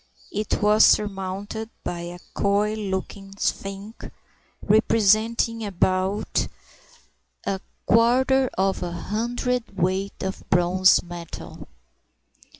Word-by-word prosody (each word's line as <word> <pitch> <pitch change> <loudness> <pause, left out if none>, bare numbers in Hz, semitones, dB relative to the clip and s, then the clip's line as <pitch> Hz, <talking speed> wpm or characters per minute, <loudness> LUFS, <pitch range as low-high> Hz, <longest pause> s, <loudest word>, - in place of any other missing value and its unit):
It 210 0 -2
was 210 +1 +6
surmounted 205 +2 +1
by 175 - -3
a 175 +1 -7 0.2
coy 205 +1 +1
looking 195 -1 -5
sphinx, 200 +2 -4 0.5
representing 220 +2 +2
about 190 +1 0 1.0
a 195 -1 -2 0.2
quarter 255 +3 +4
of 190 0 +1
a 175 - -3
hundredweight 205 -2 -2
of 190 0 -4
bronze 180 +1 +4
metal. 175 -1 -9
200 Hz, 85 wpm, -24 LUFS, 190-220 Hz, 1.0 s, was